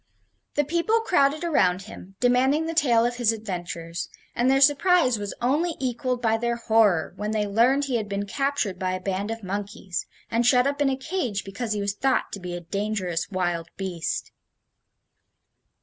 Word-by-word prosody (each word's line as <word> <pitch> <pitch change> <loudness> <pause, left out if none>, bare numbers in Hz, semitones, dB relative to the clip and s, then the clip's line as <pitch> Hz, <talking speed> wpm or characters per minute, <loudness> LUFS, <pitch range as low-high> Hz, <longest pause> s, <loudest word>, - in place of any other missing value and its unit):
The 295 - +3
people 340 +10 +1
crowded 310 -7 +2
around 190 - +2
him, 195 -2 -12
demanding 260 +5 +3
the 330 - -3
tale 240 -8 +3
of 240 0 -1
his 240 -3 +3
adventures, 175 -6 -5 0.3
and 245 +2 +2
their 270 0 +4
surprise 290 - +4
was 205 -1 -5
only 310 +7 +1
equaled 250 -1 -2
by 225 -1 +3
their 235 +1 -1
horror 220 -7 +2
when 210 0 -3
they 210 -1 +1
learned 240 +7 +3
he 260 -3 0
had 215 -2 -4
been 200 0 -2
captured 275 -6 -1
by 185 -1 -1
a 185 - -2
band 195 +2 -2
of 225 -1 -5
monkeys, 195 -1 -4 0.2
and 230 +1 +2
shut 250 +1 +4
up 285 +1 -1
in 285 - +4
a 265 - -1
cage 265 - -2
because 215 +3 -4
he 205 - -2
was 200 0 -1
thought 265 +5 0
to 200 - -5
be 180 -1 -5
a 175 - -5
dangerous 190 -2 -2
wild 175 -4 -1
beast. 185 -4 -3
225 Hz, 180 wpm, -25 LUFS, 195-270 Hz, 0.3 s, their